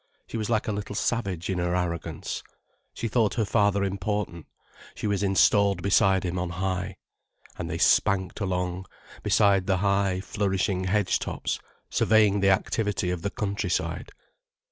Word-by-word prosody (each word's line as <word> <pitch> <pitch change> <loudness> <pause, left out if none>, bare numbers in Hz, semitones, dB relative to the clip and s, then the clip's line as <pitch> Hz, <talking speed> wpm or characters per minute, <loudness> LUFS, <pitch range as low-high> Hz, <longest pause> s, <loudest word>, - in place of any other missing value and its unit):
She - - -9
was 110 -1 -2
like 110 -2 +1
a - - +1
little 105 0 -4
savage 100 -7 -1
in 95 -2 -1
her 90 0 0
arrogance. 85 -2 -3 0.5
She 115 - -2
thought 110 -2 +1
her 115 -3 +1
father 100 -1 +2
important, 100 -3 -3 0.5
she - - -5
was 100 -2 0
installed 100 -1 +3
beside 95 -1 +3
him 90 0 -2
on 90 0 -2
high. 90 +1 -2 0.6
And - - -4
they - - -2
spanked 95 0 +2
along, 90 -2 -2 0.3
beside 100 -3 +3
the 95 -1 +2
high, 100 -1 +1
flourishing 95 -1 -1
hedge 95 0 +1
tops, - - -3 0.3
surveying 105 -2 +4
the 100 0 +3
activity 95 -1 0
of 90 -2 -3
the 100 - -1
countryside. 100 -4 -2
100 Hz, 150 wpm, -26 LUFS, 90-105 Hz, 0.6 s, surveying